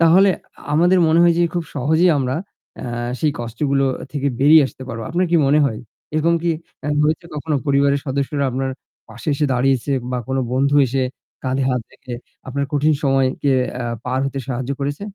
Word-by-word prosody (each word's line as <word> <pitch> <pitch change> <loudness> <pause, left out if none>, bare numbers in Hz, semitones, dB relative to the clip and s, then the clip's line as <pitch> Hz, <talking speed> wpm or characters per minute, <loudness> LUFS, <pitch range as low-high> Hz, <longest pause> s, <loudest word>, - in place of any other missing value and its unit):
তাহলে 180 +4 +6 0.4
আমাদের 175 +4 +4
মনে 160 +2 +4
হয় 170 -1 +5
যে - - +4
খুব 175 -1 -1
সহজেই 160 +7 +3
আমরা 130 -1 -1 0.5
এ - - -6 0.4
সেই 155 -2 +2
কষ্টগুলো 135 +4 0 0.3
থেকে 140 -1 0
বেরিয়ে 150 +3 +7
আসতে 130 - -11
পারবো। 115 -2 -5
আপনার 180 +3 +1
কি 175 - +4
মনে 145 +2 +4
হয় 110 -6 -1 0.4
এরকম 165 +2 +2
কি 170 - +1 0.4
এ - - -1 0.2
হয়েছে 155 +3 0
কখনো 150 0 -1
পরিবারের 140 0 +3
সদস্যরা 140 +1 -1
আপনার 130 +1 -2 0.4
পাশে 115 +5 -8
এসে 150 +1 +1
দাঁড়িয়েছে 130 +2 +1 0.2
বা 125 - -1
কোনো 135 0 0
বন্ধু 140 +3 +2
এসে 130 +2 -1 0.4
কাঁধে 130 +1 0
হাত 125 -2 -1
রেখে 125 - -8 0.3
আপনার 140 +2 -1
কঠিন 150 +1 +3
সময়কে 135 0 +2 0.3
এ - - -3 0.2
পার 130 +1 -1
হতে 135 0 -4
সাহায্য 130 0 -3
করেছে? 145 +1 -2
140 Hz, 180 wpm, -20 LUFS, 130-155 Hz, 0.5 s, বেরিয়ে